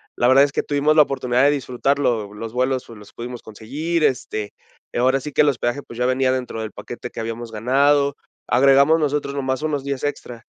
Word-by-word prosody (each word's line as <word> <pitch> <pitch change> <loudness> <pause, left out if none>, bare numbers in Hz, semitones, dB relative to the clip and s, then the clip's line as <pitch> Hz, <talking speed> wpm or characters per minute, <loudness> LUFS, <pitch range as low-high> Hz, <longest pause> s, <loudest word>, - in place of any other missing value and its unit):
la 120 - +2
verdad 135 +2 +6
es 140 - -5
que - - 0
tuvimos 145 +1 +1
la 155 - +8
oportunidad 130 -2 +1
de 145 - +5
disfrutarlo, 130 -4 0
lo 100 - -15
los 115 +2 -7
vuelos 130 +1 -1
los 105 -3 -13
pudimos 120 0 -7
conseguir, 145 +10 -3
este, 110 -6 -1 0.4
ahora 130 +3 +2
sí 150 +3 -7
que - - +4
el 150 - +4
hospedaje, 120 +1 -2
pues, 115 - -12
ya 125 - +1
venía 130 0 +2
dentro 125 -3 -3
del 110 - -5
paquete 120 0 -8
que - - -9
habíamos 115 +1 -5
ganado. 140 +5 +2 0.3
Agregamos 140 +5 +5
nosotros 145 -1 -1
nomás 130 -1 -2
unos 145 -3 -1
días 140 -1 -4
extra. 125 -5 -5
130 Hz, 205 wpm, -21 LUFS, 120-140 Hz, 0.4 s, la